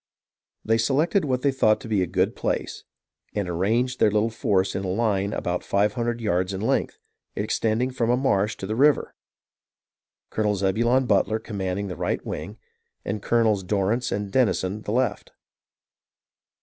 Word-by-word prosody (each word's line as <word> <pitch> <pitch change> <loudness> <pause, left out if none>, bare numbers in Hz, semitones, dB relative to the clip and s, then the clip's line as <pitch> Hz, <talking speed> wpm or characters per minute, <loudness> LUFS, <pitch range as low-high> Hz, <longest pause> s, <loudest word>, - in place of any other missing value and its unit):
They 110 +1 +2
selected 155 - +2
what 130 -2 -1
they 140 - +3
thought 110 -5 +3
to 125 - -8
be 105 -4 +1
a 90 - 0
good - - 0
place, - - -3 0.5
and 100 -3 -1
arranged 115 +9 0
their - - +5
little 105 +2 +1
force 100 -5 0
in 95 - -3
a - - -3
line 100 0 0
about 90 -3 -2
five 100 +1 +1
hundred 120 -1 -2
yards 95 -2 0
in 95 - -5
length, 110 - 0 0.4
extending 115 +4 0
from 120 -2 -1
a 125 - +3
marsh 105 -6 +1
to - - -7
the 110 +3 -3
river, 145 +4 +3 0.6
— - - -69
Colonel 105 -1 +1
Zebulon 115 +7 +2
Butler 110 -1 +2
commanding 100 -3 -3
the 90 - -5
right - - -2
wing - - -6 0.5
and 100 +1 -3
Colonels 110 -4 +2
Dorrance 105 +6 0
and 100 0 -3
Denison 105 -4 +1
the 105 - -5
left. 125 +3 -1
110 Hz, 165 wpm, -24 LUFS, 100-120 Hz, 0.6 s, their